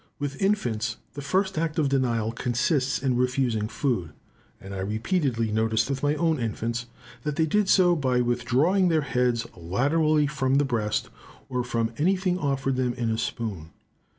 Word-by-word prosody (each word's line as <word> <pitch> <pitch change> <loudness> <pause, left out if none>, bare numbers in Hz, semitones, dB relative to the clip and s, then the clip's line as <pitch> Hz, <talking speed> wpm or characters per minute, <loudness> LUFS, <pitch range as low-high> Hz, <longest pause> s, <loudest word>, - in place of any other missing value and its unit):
With 145 -1 -4
infants, 125 - 0 0.2
the 145 - -6
first 190 +5 0
act 160 -1 -2
of 155 -3 +2
denial 120 -5 +1
consists 130 +3 0
in 130 -2 +2
refusing 125 -4 +1
food; 115 - -2 0.5
and 95 0 -9
I 95 - -4
repeatedly 115 - 0
noticed 110 +3 +1
with 135 -1 -2
my 145 +1 +2
own 160 -1 +1
infants, 115 +1 -3 0.3
that 150 +3 -3
they 160 - +2
did 200 +5 +1
so 180 -2 +5
by 130 -5 +1
withdrawing 125 +10 +2
their 160 -2 +3
heads 125 -3 0
laterally 145 - +2
from 135 -2 0
the 145 +1 +3
breast, 110 -5 -1 0.4
or 125 -1 -1
from 115 -2 -1
anything 185 +2 +1
offered 135 -3 0
them 125 -2 0
in 120 -2 -1
a 110 - 0
spoon. 100 -9 -4
130 Hz, 165 wpm, -26 LUFS, 115-150 Hz, 0.5 s, so